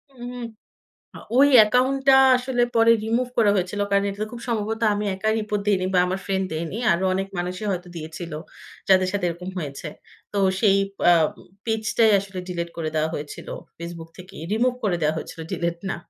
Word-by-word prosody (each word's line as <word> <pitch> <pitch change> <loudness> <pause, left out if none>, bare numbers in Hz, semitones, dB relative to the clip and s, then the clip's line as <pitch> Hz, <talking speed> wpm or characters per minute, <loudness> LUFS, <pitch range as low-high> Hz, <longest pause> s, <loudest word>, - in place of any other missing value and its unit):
হু, 240 - -11
হু। 245 - -7 1.0
ওই 285 +1 +7
অ্যাকাউন্ট 250 +5 +4
টা 265 - +9 0.2
আসলে 250 -1 -1
পরে 230 0 +5
রিমুভ 240 +3 0
করা 210 -3 +5
হয়েছিল। 185 +2 -2
কারণ 200 0 +3
এটা 205 +2 -4
খুব 235 - -7
সম্ভবত 220 0 -2
আমি 210 +1 -2
একা 195 +3 -2
রিপোর্ট 210 -1 -2
দেইনি 185 -3 +2
বা - - +5
আমার 185 +1 -2
ফ্রেন্ড 190 -1 0
দেয়নি। 165 +5 -4 0.2
আরো 180 +3 0
অনেক 195 +1 -2
মানুষই 185 +4 -3
হয়তো 180 0 -5
দিয়েছিল। 160 +1 -7 0.6
যাদের 185 -1 +5
সাথে 200 -3 -1
এরকম 180 +2 -6
হয়েছে। 150 0 -5 0.4
তো 200 - -1 0.2
সেই 195 -3 +4 0.3
আ - - +8 0.5
পেজটাই 220 0 +2
আসলে 195 -1 -6
ডিলিট 170 -1 -3
করে 160 -2 -2
দেয়া 155 0 +1
হয়েছিল 145 0 -7 0.3
ফেসবুক 170 -1 -8
থেকে। 180 +1 -12 0.2
রিমুভ 245 +3 +2
করে 180 -4 +1
দেয়া 155 +1 +2
হয়েছিল 165 - -7
ডিলিট 170 0 -2
না। - - -2
195 Hz, 180 wpm, -23 LUFS, 175-220 Hz, 1.0 s, টা